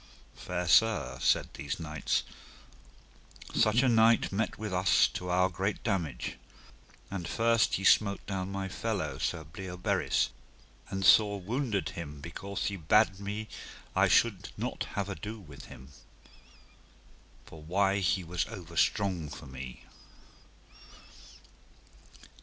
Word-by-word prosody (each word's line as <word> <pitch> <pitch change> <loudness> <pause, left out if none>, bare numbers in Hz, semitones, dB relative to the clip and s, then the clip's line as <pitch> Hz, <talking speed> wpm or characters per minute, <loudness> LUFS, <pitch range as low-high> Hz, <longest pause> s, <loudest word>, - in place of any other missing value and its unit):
Fair 90 0 -4
sir, 115 +5 +3
said - - +3
these 70 +3 -5
knights, 75 -3 -1 1.3
such 115 +3 +3
a - - +4
knight 115 -1 +4
met 110 +2 -1
with 105 -2 -5
us 90 +1 +4
to 90 - -6
our 90 +1 +3
great 95 +3 -3
damage. 85 - -2 0.7
And 90 -4 -4
first 115 0 +2
he 95 - -3
smote 100 0 +4
down 95 -1 -3
my 95 0 -3
fellow, 90 -9 -3
Sir 80 0 -2
Bleoberis, 90 +3 -1 0.6
and 95 0 -2
sore 100 0 +6
wounded 110 +1 -1
him 75 -4 -7
because 95 +6 -5
he 100 - -2
bade 95 +4 +3
me 105 +2 -4 0.5
I - - +5
should 110 -6 +2
not - - -3
have 100 -1 -1
ado 105 +4 -6
with 75 -8 -12
him, 65 +2 -12 1.6
for 80 - -12
why 95 +5 +1
he 95 0 +1
was 90 +1 -2
overstrong 90 -2 -1
for 70 - -9
me. 65 -1 -9
95 Hz, 125 wpm, -30 LUFS, 85-105 Hz, 1.6 s, sore